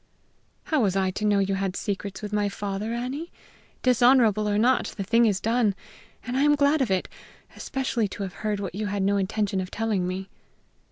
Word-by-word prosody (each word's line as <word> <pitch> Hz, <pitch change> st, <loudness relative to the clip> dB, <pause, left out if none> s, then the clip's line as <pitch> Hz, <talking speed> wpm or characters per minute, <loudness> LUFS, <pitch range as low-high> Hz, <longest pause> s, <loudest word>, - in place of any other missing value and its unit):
"How 310 Hz, -5 st, +1 dB
was 195 Hz, -4 st, +1 dB
I 190 Hz, -1 st, +1 dB
to 210 Hz, +3 st, -3 dB
know 205 Hz, -1 st, +3 dB
you 195 Hz, 0 st, +1 dB
had 195 Hz, -1 st, -2 dB
secrets 200 Hz, 0 st, -4 dB
with 210 Hz, 0 st, -5 dB
my 205 Hz, -1 st, +1 dB
father, 205 Hz, +2 st, -4 dB
Annie? 255 Hz, +8 st, -4 dB, 0.5 s
Dishonorable 240 Hz, -4 st, +4 dB
or 205 Hz, -, +1 dB
not, 245 Hz, +4 st, +3 dB
the 200 Hz, -, -2 dB
thing 230 Hz, +4 st, +4 dB
is 200 Hz, -3 st, +1 dB
done, 225 Hz, -2 st, +1 dB, 0.5 s
and 250 Hz, 0 st, -3 dB
I 265 Hz, -, +2 dB
am 295 Hz, 0 st, +5 dB
glad 285 Hz, +1 st, +3 dB
of 255 Hz, -, +1 dB
it 190 Hz, -1 st, 0 dB, 0.5 s
especially 260 Hz, -5 st, -1 dB
to 200 Hz, +1 st, -6 dB
have 190 Hz, -2 st, -5 dB
heard 210 Hz, -1 st, -1 dB
what 195 Hz, -4 st, -4 dB
you 210 Hz, +2 st, -3 dB
had 200 Hz, -1 st, -1 dB
no 200 Hz, +1 st, +2 dB
intention 195 Hz, 0 st, -1 dB
of 185 Hz, -, -6 dB
telling 210 Hz, -5 st, -1 dB
me." 190 Hz, +1 st, -4 dB
210 Hz, 205 wpm, -25 LUFS, 195-240 Hz, 0.5 s, am